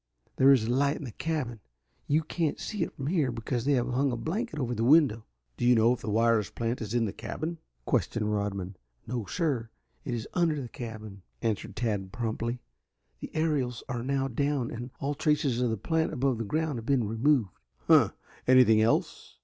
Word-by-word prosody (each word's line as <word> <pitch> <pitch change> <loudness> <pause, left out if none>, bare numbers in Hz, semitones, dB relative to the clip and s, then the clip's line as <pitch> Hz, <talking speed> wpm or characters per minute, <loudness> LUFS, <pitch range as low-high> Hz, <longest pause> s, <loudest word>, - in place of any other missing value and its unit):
There 135 +1 +7
is 130 -5 +5
a 115 - -1
light 140 +2 +2
in 155 - -7
the 125 - -6
cabin. 130 -4 -3 0.5
You 155 +3 +2
can't 160 0 -1
see 210 -4 -4
it - - -1
from 135 - -5
here 150 -5 +1
because 120 +1 -3
they 145 - +3
have 125 -2 +1
hung 130 +2 +1
a 120 - -2
blanket 175 - -3
over 125 -4 -1
the 115 -1 -1
window." 130 -5 +4 0.3
"Do - - -4
you 125 0 +6
know 115 +2 +5
if 125 - -6
the - - -4
wireless 115 -1 +2
plant 115 +1 -3
is 110 +1 -3
in 120 -1 +2
the 100 - -3
cabin?" 155 +8 -5 0.3
questioned 105 -2 0
Rodman. 100 -2 -3 0.3
"No, 115 -3 -4
sir, 140 -10 -1 0.3
it 120 - -3
is 115 - -5
under 165 -4 +2
the 125 -3 -6
cabin," 110 -5 -8 0.2
answered 110 -3 -2
Tad 105 -5 -2
promptly. 115 +2 -3 0.6
"The - - -7
aerials 145 -7 0
are 125 -3 -3
now 135 +1 0
down 140 0 -1
and 120 +2 -6
all 140 +2 -1
traces 145 -4 +1
of 125 - +2
the 110 - -1
plant 160 - 0
above 130 -6 0
ground 155 -1 -1
have 115 - -9
been 130 -6 +2
removed." 115 -1 +2 0.3
"Huh! - - +6 0.4
Anything 125 -4 +6
else?" 110 +1 0
125 Hz, 200 wpm, -29 LUFS, 115-145 Hz, 0.6 s, There